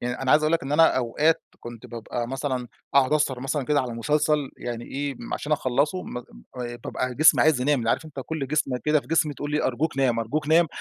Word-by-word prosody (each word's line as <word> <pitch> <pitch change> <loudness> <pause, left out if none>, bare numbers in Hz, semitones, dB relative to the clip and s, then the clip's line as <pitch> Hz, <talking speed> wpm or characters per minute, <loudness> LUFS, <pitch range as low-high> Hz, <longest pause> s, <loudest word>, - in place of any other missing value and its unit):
يعني 125 +2 -3
أنا 130 - 0
عايز 150 +1 +5
أقول 155 - +1
لك 165 - +1
إن 135 +2 -4
أنا 160 -2 +5
أوقات 145 +6 +1 0.2
كنت 120 -1 -9
بابقى 120 0 -5
مثلًا 130 -2 -3 0.3
أقعد 140 +1 +4
أسهر 145 -4 +1
مثلًا 135 +1 -2
كده 145 +1 +2
على 125 -2 -4
مسلسل 150 +3 +1
يعني 120 -1 -5
إيه 140 0 -4
م - - -5
عشان 150 - -3
أخلصه 145 +6 0
م - - -8 0.4
آآ 120 0 -5
طب - - -7
أنا 130 0 -1
جسمي 155 +5 +6
عايز 150 -5 +3
ينام، 145 +2 +2
اللي 115 -1 0
عارف - - 0
أنت 145 -4 -8
كل 155 -4 -3
جسمة 135 -3 -1
كده 150 0 +3
في - - -19
جسمي 155 -3 +1
تقول 145 - -5
لي 150 +1 0
أرجوك 135 +4 -1
نام 125 -4 +2
أرجوك 150 +7 -2
نام 165 +2 +5
140 Hz, 240 wpm, -25 LUFS, 125-150 Hz, 0.4 s, جسمي